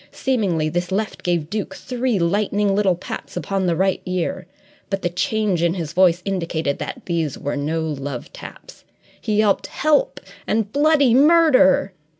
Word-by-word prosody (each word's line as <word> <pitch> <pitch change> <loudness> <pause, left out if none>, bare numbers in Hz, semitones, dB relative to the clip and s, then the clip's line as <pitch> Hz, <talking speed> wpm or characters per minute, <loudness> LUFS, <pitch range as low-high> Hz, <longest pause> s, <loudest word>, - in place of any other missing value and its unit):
Seemingly 195 -12 0
this 175 +3 -2
left 210 +2 -2
gave 170 -4 -1
Duke 205 -2 -3
three 250 -1 -2
lightning 200 +3 +1
little 195 -3 +2
pats 180 - -8
upon 190 +3 -1
the 170 - +1
right 190 +2 0
ear, 180 -2 -3 0.4
but 195 -1 -3
the 175 - +1
change 185 0 0
in 170 +1 +1
his 165 -4 -5
voice 180 -1 +3
indicated 165 -6 -2
that - - -6
these 165 -5 -2
were 145 - -3
no 155 +3 -2
love 140 -5 -5
taps. - - -12 0.4
He 215 - -1
yelled 210 -2 +2
"help!" 300 0 +1 0.3
and 215 -1 0
"bloody 285 -4 +4
murder!" 285 - +5
190 Hz, 155 wpm, -21 LUFS, 170-215 Hz, 0.4 s, murder